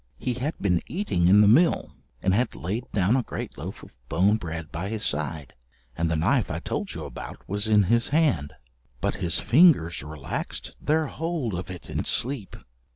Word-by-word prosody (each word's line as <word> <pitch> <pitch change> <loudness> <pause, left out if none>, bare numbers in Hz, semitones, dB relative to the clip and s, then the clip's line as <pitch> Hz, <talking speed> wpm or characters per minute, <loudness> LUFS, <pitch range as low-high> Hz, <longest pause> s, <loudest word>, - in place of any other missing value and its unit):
He 125 - -2
had 130 +7 -3
been 90 -4 +1
eating 120 - 0
in 100 +3 +7
the 105 - +6
mill, 115 - +3 0.3
and 95 - +3
had 120 +5 +1
laid 105 +8 -4
down 100 +3 +2
a 130 - +3
great - - -6
loaf - - -7
of - - -14
bone 100 +5 +3
bread 80 -5 -6
by 90 +5 -4
his 110 -1 -2
side, 75 -1 -1 0.4
and 85 +2 0
the 80 - +1
knife 105 - +2
I - - -2
told - - -4
you - - -5
about - - -9
was 105 +3 -1
in 105 -1 +5
his 115 +5 +2
hand, 145 - +1 0.5
but - - -1
his 85 -3 0
fingers 125 - +4
relaxed 75 0 -5
their 155 +1 +2
hold 155 - -3
of 90 +1 -4
it 90 -3 -8
in - - -2
sleep. 125 -6 -1
100 Hz, 190 wpm, -26 LUFS, 85-125 Hz, 0.5 s, in